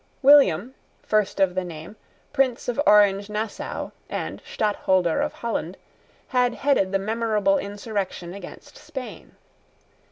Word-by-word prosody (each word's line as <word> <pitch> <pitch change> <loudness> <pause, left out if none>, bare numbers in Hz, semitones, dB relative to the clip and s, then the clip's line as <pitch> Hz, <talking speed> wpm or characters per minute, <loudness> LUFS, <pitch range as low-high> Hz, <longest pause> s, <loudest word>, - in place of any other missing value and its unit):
William, 260 - +6 0.3
first 215 -2 0
of 190 -2 +3
the 185 0 -1
name, 165 +2 -9 0.4
Prince 260 -3 +1
of 245 +3 0
Orange 205 -1 +5
Nassau, 210 +1 -4 0.2
and - - -4
Stadtholder 190 -5 +1
of - - -1
Holland, 195 -6 -4 0.5
had 250 -1 +2
headed 270 -10 +1
the 195 - +2
memorable 225 +6 +1
insurrection 200 -4 -4
against 200 +9 -11
Spain. 285 -5 -9
210 Hz, 120 wpm, -24 LUFS, 190-245 Hz, 0.5 s, William